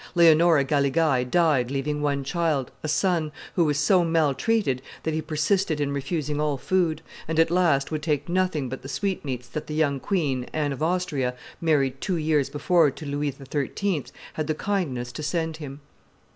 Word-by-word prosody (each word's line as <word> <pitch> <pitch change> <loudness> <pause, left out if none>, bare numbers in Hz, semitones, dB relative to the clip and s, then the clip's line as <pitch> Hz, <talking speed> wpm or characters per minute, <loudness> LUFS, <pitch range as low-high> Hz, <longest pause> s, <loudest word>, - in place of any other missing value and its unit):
Leonora 165 -2 +6
Galigai 140 0 +2
died 140 -2 +2
leaving 145 +2 -2
one 140 -1 0
child, 150 -2 -1
a - - -4
son, 165 -1 +1 0.2
who 170 - +3
was 150 -2 +1
so 175 +5 +4
maltreated 165 - +1 0.2
that 160 - -1
he 160 - -1
persisted 155 +2 0
in 145 -1 0
refusing 150 +1 -2
all 150 -2 0
food, 160 +2 0 0.2
and, 160 0 -2
at 165 0 +4
last, 170 -6 +2
would 155 -1 -2
take 150 -2 -1
nothing 175 -6 0
but 130 +2 -6
the 135 - -9
sweetmeats 135 -7 -3
that 155 - -6
the 150 - -4
young 145 -3 +1
queen, 140 -9 -1
Anne 150 -2 0
of 135 - -8
Austria, 155 -7 0 0.3
married 140 -5 +1
two 185 -3 -1
years 155 -3 +1
before 160 +1 +3
to 150 - -9
Louis 145 +1 -1
XIII., 145 +5 -2 0.3
had 155 -1 -3
the 155 - 0
kindness 150 -12 -2
to 140 - -7
send 160 0 -2
him. 145 -2 -8
150 Hz, 175 wpm, -25 LUFS, 140-165 Hz, 0.3 s, Leonora